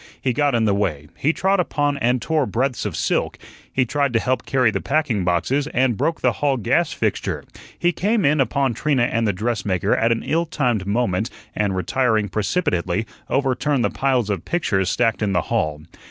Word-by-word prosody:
He 130 - 0
got 145 -1 +1
in 115 -1 +2
the 105 - +3
way; 80 -8 -2
he 150 - +1
trod 190 +3 +1
upon 145 -4 0
and 125 +1 +2
tore 155 +1 0
breadths 125 -2 -1
of 90 - -5
silk; - - -1 0.3
he 130 - +1
tried 140 +1 0
to 115 - +3
help 130 +2 -1
carry 125 -4 +3
the - - -2
packing 135 -9 0
boxes, 105 - 0
and 130 -2 +2
broke 165 +10 -1
the - - +3
hall 140 -2 0
gas 110 - +1
fixture; - - -2 0.3
he 175 - +2
came 210 +4 0
in 145 0 +3
upon 135 -1 +1
Trina 135 +1 +1
and 115 -1 +1
the - - +3
dress 105 +1 -2
maker 95 0 +1
at 115 +1 +2
an 115 - 0
ill 165 +2 0
timed 120 - -1
moment, 105 -1 0 0.3
and 100 -2 0
retiring 110 +2 +1
precipitately, 100 - -1 0.2
overturned 135 0 +1
the - - 0
piles 130 -6 +1
of 95 -4 -3
pictures 95 - 0
stacked 115 +2 +1
in 100 -2 0
the 90 - +2
hall. 75 -1 0
120 Hz, 195 wpm, -21 LUFS, 105-140 Hz, 0.3 s, the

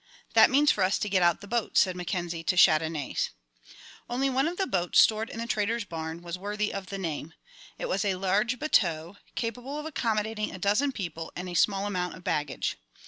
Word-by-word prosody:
"That - - +7
means 285 +2 +5
for 195 - +1
us 190 +3 +2
to 210 - -2
get 190 -1 +2
out 175 -1 +3
the 200 - -10
boats," 235 0 +1
said 185 -2 +1
Mackenzie 175 -2 -3
to 185 - +1
Chandonnais. 155 -3 +3 0.8
Only 265 +3 0
one 265 +3 +2
of 350 +2 -4
the 385 - +1
boats 180 - +2
stored 220 +1 +4
in - - -8
the 230 - -3
trader's 225 0 -1
barn 165 -1 -6
was 175 +1 -5
worthy 210 +2 -2
of 195 -1 -5
the 195 - -5
name. 160 -3 -5 0.4
It - - -3
was - - 0
a 195 -2 +1
large 200 +6 +1
bateau, 175 - +1 0.2
capable 245 +5 -4
of 300 - -5
accommodating 220 -7 -1
a - - -7
dozen 210 +10 +2
people 170 -8 -5
and 180 +1 -5
a 180 - -6
small 195 +3 +2
amount 180 -3 -2
of 185 - -14
baggage. 150 -6 -2
200 Hz, 205 wpm, -28 LUFS, 175-230 Hz, 0.8 s, That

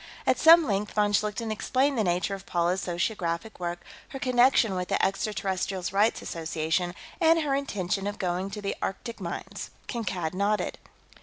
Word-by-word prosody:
At - - +2
some 330 0 +8
length, 205 -2 -1
von 210 -1 +2
Schlichten 210 +2 0
explained 265 +6 +1
the 225 - +1
nature 180 +2 0
of 195 -1 -7
Paula's 175 +2 +1
sociographic 175 +2 -2
work, 175 0 -4 0.3
her - - -6
connection 250 -4 +4
with 180 -1 -2
the - - +1
Extraterrestrials' 190 -2 -2
Rights 210 +3 +2
Association, 160 +2 -2 0.2
and 330 -1 +5
her 290 -3 0
intention 200 -8 -1
of 205 0 -4
going 180 +1 -1
to 205 +1 -7
the 200 - -2
Arctic 230 +4 -4
mines. 170 -1 -5 0.2
Kankad 190 -9 -3
nodded. 200 +3 0
195 Hz, 160 wpm, -27 LUFS, 180-225 Hz, 0.3 s, some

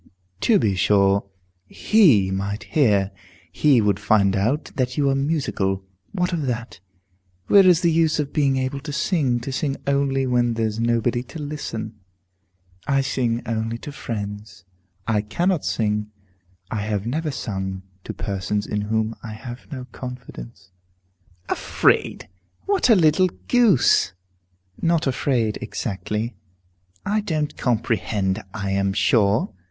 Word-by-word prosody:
"To 220 - +4
be 105 - +1
sure, 100 +1 +2 0.4
he 140 - +4
might 100 +2 -3
hear. 105 -9 +2 0.4
He 140 -6 +4
would 105 -1 +1
find 100 -2 +3
out 115 +10 0
that 125 -1 -1
you 145 -1 +2
are - - +1
musical. 135 -10 -1 0.3
What 180 -2 -1
of 155 -5 -1
that? 120 -4 -4 0.7
Where 195 -2 +6
is 180 -2 +5
the 170 - +3
use 160 -1 +2
of 150 -2 -2
being 140 -3 +2
able 130 +1 -2
to 150 +2 -7
sing, 140 -4 +1
to 135 - -5
sing 135 +1 -2
only 140 -1 +1
when 120 -2 +1
there's 110 -1 -1
nobody 120 +1 +1
to 160 - -9
listen?" 115 -8 -5 0.9
"I 140 -1 +3
sing 120 -3 -1
only 115 0 -2
to 145 - -8
friends. 105 -5 -6 0.4
I 110 -2 +1
cannot 170 - 0
sing, 105 -1 0 0.6
I 110 - -2
have 105 -1 -2
never 155 +6 -2
sung, 95 -7 -4 0.2
to - - -4
persons 100 0 -3
in 105 - -2
whom 110 +1 -1
I 110 -2 -7
have 120 +2 -9
no 130 -3 -6
confidence." 100 - -9 0.8
"Afraid! - - +1 0.4
What 395 -9 +2
a 225 - +8
little 170 +1 +4 0.2
goose!" 210 - +4 0.7
"Not 165 -1 +2
afraid, 125 -5 0
exactly." 105 +2 -3 0.7
"I 210 +1 +1
don't 155 -6 -2
comprehend, 105 -4 -1
I 100 -1 -3
am 100 0 +1
sure." 105 0 +2
120 Hz, 135 wpm, -22 LUFS, 105-145 Hz, 0.9 s, a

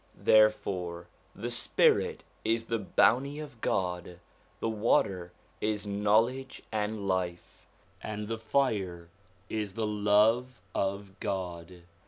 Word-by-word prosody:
Therefore 95 -5 +3 0.3
the 120 +4 -4
spirit 120 - +2 0.2
is 115 +1 +1
the 115 0 -1
bounty 130 +7 +3
of 140 -7 -9
God, 90 -1 -1 0.4
the - - -1
water 100 -5 +1 0.3
is 105 -1 -1
knowledge 110 +6 +1
and 105 -1 -2
life, 90 -2 -3 0.3
and 105 -1 -5
the 115 0 -3
fire 100 -9 0 0.4
is 105 -3 -3
the 110 +1 -1
love 105 +4 +3
of 100 0 -2
God. 90 -2 -4
105 Hz, 110 wpm, -30 LUFS, 95-115 Hz, 0.4 s, Therefore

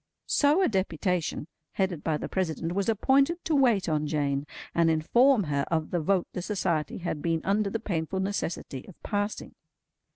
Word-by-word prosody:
So 300 +6 +3
a - - +4
deputation, 180 - -1 0.3
headed 185 -5 -1
by 155 -2 0
the - - -5
President, 170 -3 -2
was 200 +4 0
appointed 275 - +2
to 320 - 0
wait 240 -10 +3
on 155 -2 0
Jane, 145 -1 -1 0.3
and 170 -1 +3
inform 230 - +4
her 145 -3 0
of 160 -2 -1
the 175 - +1
vote 180 +3 +1
the 180 - -3
Society 175 -5 -1
had 170 -4 -4
been 165 0 0
under 200 +1 +1
the 225 - -2
painful 185 -3 -2
necessity 185 -8 -3
of 190 - -14
passing. 205 0 -3
185 Hz, 170 wpm, -28 LUFS, 160-210 Hz, 0.3 s, a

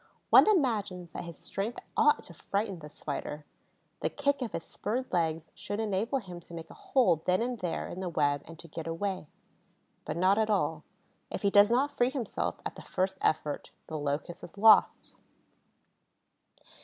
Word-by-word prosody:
One - - +9
imagines 210 - +1
that - - -6
his 170 -1 -9
strength 215 +5 -3 0.2
ought 295 0 +4
to 175 - -8
frighten 200 +2 -2
the 150 -1 -10
Spider; 150 0 -5 0.5
the - - 0
kick 280 -1 0
of 245 - -2
his 165 - -3
spurred 245 +3 -4
legs 165 -2 0
should 205 +1 -4
enable 220 +4 0
him 180 -8 -7
to 170 0 -12
make 165 -1 -8
a - - -10
hole 240 - +2
then 180 0 +4
and 245 -1 -3
there 175 -3 -2
in 180 - -7
the 185 -1 -2
web 145 -3 +1
and 165 +1 -11
to 170 - -9
get 165 0 -6
away. 185 0 -2 0.8
But 155 - -4
not 190 +4 +4
at 220 0 +2
all. 210 - +1 0.5
If - - -5
he 200 - +3
does 205 +1 +7
not 265 +5 +2
free 245 +1 +3
himself 260 -6 -3
at - - -3
the - - -9
first 190 +1 -1
effort, 150 -1 0 0.2
the 155 -1 -5
Locust 145 +4 -3
is 180 - -11
lost. 215 +1 +5
190 Hz, 180 wpm, -30 LUFS, 165-225 Hz, 0.8 s, One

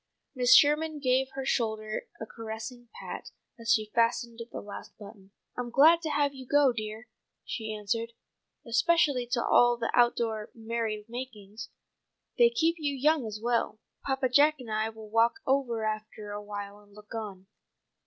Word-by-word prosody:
Mrs. 250 0 +6
Sherman 305 +1 +4
gave 260 -1 +2
her 270 -1 -4
shoulder 220 -4 -1
a 225 - -5
caressing 225 +2 -8
pat - - -7 0.3
as 230 0 -1
she 215 -1 +2
fastened 235 0 +1
the - - -5
last 205 - -10
button. 200 -2 -13 0.3
"I'm 245 -1 -4
glad 315 +7 +6
to 320 - -3
have 290 -1 +1
you 260 -2 -10
go, 285 -2 +4
dear," 215 +1 -6 0.4
she 220 -2 -4
answered, 225 +2 -3 0.5
"especially 265 +1 +2
to 235 0 0
all 240 0 +5
the 230 -1 -2
out 240 -1 +4
door 220 -2 -2
merry 225 -2 -3
makings. 225 -3 -8 0.7
They 475 -1 +7
keep 340 -8 +1
you 290 -2 -1
young 295 0 +2
and 215 - -6
well. 235 -2 0 0.2
Papa 265 -1 0
Jack 290 +4 +5
and 240 -4 -8
I 215 +1 0
will 220 -1 -11
walk 230 +1 +3
over 250 -5 0
after 215 -1 -5
awhile 205 0 -6
and 205 -1 -21
look 210 +1 -13
on." 205 -4 -6
235 Hz, 165 wpm, -29 LUFS, 215-265 Hz, 0.7 s, They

